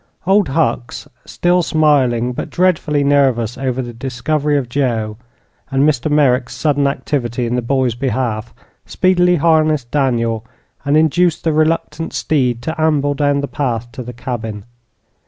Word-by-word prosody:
Old 195 Hz, 0 st, +3 dB
Hucks, 135 Hz, -4 st, -1 dB, 0.2 s
still 175 Hz, +1 st, +1 dB
smiling, 135 Hz, -7 st, +2 dB
but -, -, -5 dB
dreadfully 160 Hz, -5 st, +1 dB
nervous 130 Hz, -5 st, +2 dB
over 130 Hz, 0 st, -2 dB
the 120 Hz, -1 st, -8 dB
discovery 140 Hz, +4 st, -1 dB
of 135 Hz, -3 st, -2 dB
Joe, 115 Hz, -5 st, -1 dB, 0.5 s
and 135 Hz, +1 st, +2 dB
Mr. 155 Hz, 0 st, 0 dB
Merrick's 135 Hz, -4 st, +2 dB
sudden 145 Hz, -2 st, +1 dB
activity 125 Hz, -4 st, -2 dB
in 120 Hz, -, -2 dB
the 125 Hz, -, 0 dB
boy's 130 Hz, 0 st, 0 dB
behalf, 120 Hz, -3 st, -2 dB, 0.4 s
speedily 180 Hz, -1 st, +2 dB
harnessed 155 Hz, -5 st, +2 dB
Daniel 115 Hz, -6 st, 0 dB, 0.4 s
and 145 Hz, +2 st, +2 dB
induced 160 Hz, +2 st, +2 dB
the 160 Hz, -, +1 dB
reluctant 155 Hz, 0 st, 0 dB
steed 125 Hz, -6 st, 0 dB
to 160 Hz, 0 st, -3 dB
amble 145 Hz, -2 st, +2 dB
down 145 Hz, 0 st, +1 dB
the 140 Hz, -, -3 dB
path 120 Hz, -3 st, -3 dB
to 130 Hz, -, -7 dB
the 125 Hz, 0 st, -7 dB
cabin. 115 Hz, -4 st, -6 dB
140 Hz, 145 wpm, -17 LUFS, 120-155 Hz, 0.5 s, Old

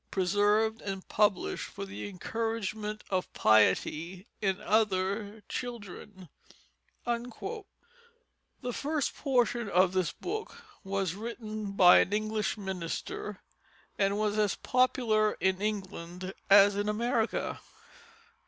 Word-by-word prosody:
Preserved 205 Hz, +4 st, +2 dB
and 195 Hz, -2 st, -5 dB
Published 205 Hz, -3 st, +1 dB
for 200 Hz, -, -7 dB
the 200 Hz, +1 st, -6 dB
Encouragement 215 Hz, +1 st, -3 dB
of 185 Hz, -1 st, -1 dB
Piety 160 Hz, -, +2 dB, 0.2 s
in 195 Hz, -2 st, +1 dB
other 205 Hz, 0 st, 0 dB
Children._ 205 Hz, -5 st, -7 dB, 0.8 s
The 410 Hz, -, -7 dB
first 295 Hz, +2 st, -1 dB
portion 240 Hz, -5 st, +1 dB
of 185 Hz, 0 st, +4 dB
this 185 Hz, -4 st, +1 dB
book 435 Hz, +4 st, -6 dB, 0.2 s
was 195 Hz, -3 st, -1 dB
written 215 Hz, -1 st, -5 dB
by 180 Hz, -2 st, +8 dB
an 195 Hz, -, +1 dB
English 215 Hz, 0 st, -1 dB
minister 190 Hz, +1 st, -5 dB, 0.5 s
and 200 Hz, 0 st, +1 dB
was 210 Hz, 0 st, 0 dB
as 210 Hz, -2 st, +2 dB
popular 235 Hz, -4 st, +2 dB
in 190 Hz, 0 st, +1 dB
England 190 Hz, -3 st, -4 dB, 0.2 s
as 200 Hz, 0 st, +7 dB
in 205 Hz, +1 st, 0 dB
America. 230 Hz, +1 st, 0 dB
210 Hz, 105 wpm, -30 LUFS, 190-230 Hz, 0.8 s, by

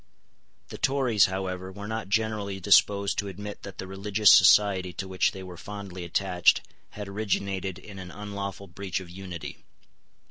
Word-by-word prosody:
The -, -, -8 dB
Tories, 130 Hz, -6 st, +3 dB
however, 95 Hz, -1 st, -4 dB
were 100 Hz, +2 st, -8 dB
not 110 Hz, -3 st, -4 dB
generally 105 Hz, -2 st, -1 dB
disposed 100 Hz, +1 st, +4 dB
to 100 Hz, -, -2 dB
admit 105 Hz, +2 st, -7 dB
that 100 Hz, -2 st, -9 dB
the -, -, -5 dB
religious 100 Hz, +2 st, +3 dB
society 95 Hz, -1 st, +6 dB
to 95 Hz, -, -5 dB
which 95 Hz, 0 st, +1 dB
they 95 Hz, -, -8 dB
were 90 Hz, -1 st, -9 dB
fondly 100 Hz, -1 st, -7 dB
attached 90 Hz, +1 st, +2 dB, 0.4 s
had 105 Hz, -1 st, -5 dB
originated 100 Hz, -2 st, -2 dB
in 100 Hz, -2 st, -11 dB
an 90 Hz, -1 st, -8 dB
unlawful 100 Hz, 0 st, -6 dB
breach 95 Hz, 0 st, -4 dB
of 90 Hz, -2 st, -11 dB
unity. 90 Hz, -2 st, -7 dB
100 Hz, 155 wpm, -27 LUFS, 95-105 Hz, 0.4 s, society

